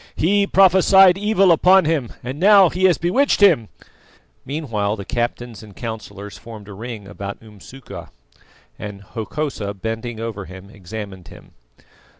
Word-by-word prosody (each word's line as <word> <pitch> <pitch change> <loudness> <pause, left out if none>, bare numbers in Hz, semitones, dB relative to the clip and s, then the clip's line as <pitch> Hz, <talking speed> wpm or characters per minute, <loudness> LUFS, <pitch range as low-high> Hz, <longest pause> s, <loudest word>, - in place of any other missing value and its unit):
He 200 +4 +2
prophesied 190 0 +5
evil 195 -2 +2
upon 185 +2 +5
him, 150 -7 -1
and 130 +4 -6
now 195 -1 +6
he 185 +3 0
has 180 -3 +4
bewitched 200 - +1
him!" 165 - +4 0.7
Meanwhile 115 -8 -3
the 100 -2 -8
captains 120 0 -4
and 105 -3 -14
councillors 105 -3 -8
formed 110 -3 -11
a 105 - -10
ring 110 -1 -8
about 100 0 -7
Umsuka, 110 +4 -12 0.7
and 105 -1 -8
Hokosa 110 -1 -5
bending 115 +3 -5
over 110 -4 -5
him 95 +2 -12
examined 100 -2 -9
him. - - -15
115 Hz, 140 wpm, -20 LUFS, -, 0.7 s, now